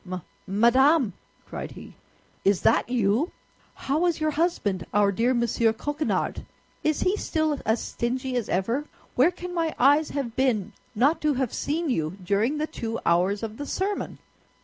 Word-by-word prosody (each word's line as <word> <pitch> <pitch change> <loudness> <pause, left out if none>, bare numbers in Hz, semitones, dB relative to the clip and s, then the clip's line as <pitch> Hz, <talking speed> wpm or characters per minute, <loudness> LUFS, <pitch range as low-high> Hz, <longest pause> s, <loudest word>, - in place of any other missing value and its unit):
"Ma 185 -1 -5 0.3
madame!" 240 - +4 0.3
cried - - -6
he; - - -11 0.5
"is 195 -2 +3
that 225 +1 +3
you? 240 - +1 0.4
How 310 +6 0
is 340 -3 0
your 310 0 +1
husband, 290 - 0
our 205 -1 +4
dear 230 +6 +1
Monsieur 235 -2 +2
Coquenard? 295 +6 -2 0.4
Is 310 -1 +1
he 370 - +2
still 315 -7 -1
as 220 +2 +2
stingy 255 +2 -2
as 240 -4 -1
ever? 230 +10 0 0.3
Where 265 +7 +5
can 360 0 -7
my 330 -2 -1
eyes 290 +4 +4
have 255 -5 -3
been 220 -6 +1 0.2
not 275 +9 +3
to 300 -2 +2
have 255 -3 -1
seen 315 0 -1
you 160 -3 -1
during 210 +10 +1
the 305 - 0
two 230 -7 -4
hours 185 +5 +2
of 220 0 -5
the 290 - -5
sermon?" 400 +2 -2
255 Hz, 165 wpm, -26 LUFS, 215-305 Hz, 0.5 s, Where